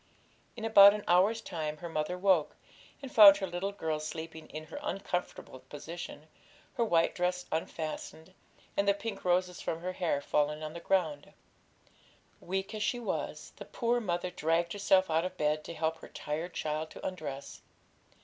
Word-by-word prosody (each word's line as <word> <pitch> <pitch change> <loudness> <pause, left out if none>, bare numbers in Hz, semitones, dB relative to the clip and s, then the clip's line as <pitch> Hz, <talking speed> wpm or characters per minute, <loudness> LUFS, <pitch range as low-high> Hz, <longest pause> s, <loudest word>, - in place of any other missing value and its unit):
In 225 -2 -5
about 200 -2 +9
an 210 - -5
hour's 195 +6 +4
time 155 -6 -4
her 170 - -7
mother 160 +2 -2
woke, 180 -5 +2 0.5
and 265 - -8
found 200 -3 +10
her 195 - -2
little 180 +2 -3
girl 160 -6 -2
sleeping 160 +1 -7
in 155 +1 -7
her 285 - -8
uncomfortable 180 - -4
position, 150 +3 -8 0.5
her 235 - +1
white 170 -7 +2
dress 180 0 -1
unfastened, 160 +2 -5 0.4
and 200 - +1
the 200 - +4
pink 225 +2 -6
roses 180 0 +1
from 165 - -3
her 185 +1 -3
hair 170 -6 0
fallen 150 +1 0
on 155 0 -5
the 170 - -7
ground. 165 -6 -1 1.1
Weak 190 +3 -3
as 215 - -4
she 240 +3 0
was, 235 - -4
the - - -8
poor 240 0 0
mother 180 -3 -2
dragged 170 +1 0
herself 190 -3 +3
out 160 +1 +2
of 185 - -5
bed 150 0 0
to - - -6
help 160 0 -1
her - - -11
tired 160 +4 -5
child 155 +1 -2
to - - -10
undress. 145 -7 -6
175 Hz, 170 wpm, -31 LUFS, 155-195 Hz, 1.1 s, found